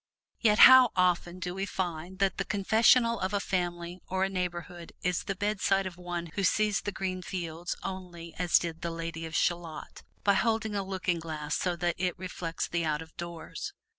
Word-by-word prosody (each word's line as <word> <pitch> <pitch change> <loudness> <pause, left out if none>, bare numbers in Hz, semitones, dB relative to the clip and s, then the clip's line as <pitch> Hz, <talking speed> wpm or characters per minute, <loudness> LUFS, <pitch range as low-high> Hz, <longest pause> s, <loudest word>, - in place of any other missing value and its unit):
Yet 215 -2 +4
how 260 -1 +9
often 180 -1 +2
do 180 -1 -4
we 195 +1 -3
find 180 -1 -4
that 195 -1 +1
the 195 - 0
confessional 225 +4 +4
of 190 +2 -1
a - - +2
family 175 -2 -3
or 190 0 0
a 195 - +1
neighborhood 175 -2 -4
is 180 -1 0
the 195 - -2
bedside 195 -1 +1
of 185 -2 -5
one 175 -2 -5
who 195 - -2
sees 210 +1 +2
the 205 - -3
green 185 -1 -3
fields 175 -2 -4
only 175 -3 -7
as 180 -1 +4
did 165 -1 -4
the 170 - -2
Lady 165 0 -5
of 160 - -7
Shalott, 170 -3 -2 0.2
by 200 - +4
holding 220 +1 +1
a 200 - 0
looking 185 -3 -2
glass 155 -2 -4
so 180 -2 0
that 175 0 0
it 180 0 -1
reflects 180 -2 -4
the 170 -1 -1
out 155 0 -1
of 160 - -19
doors. 170 -1 -6
180 Hz, 195 wpm, -29 LUFS, 170-195 Hz, 0.2 s, how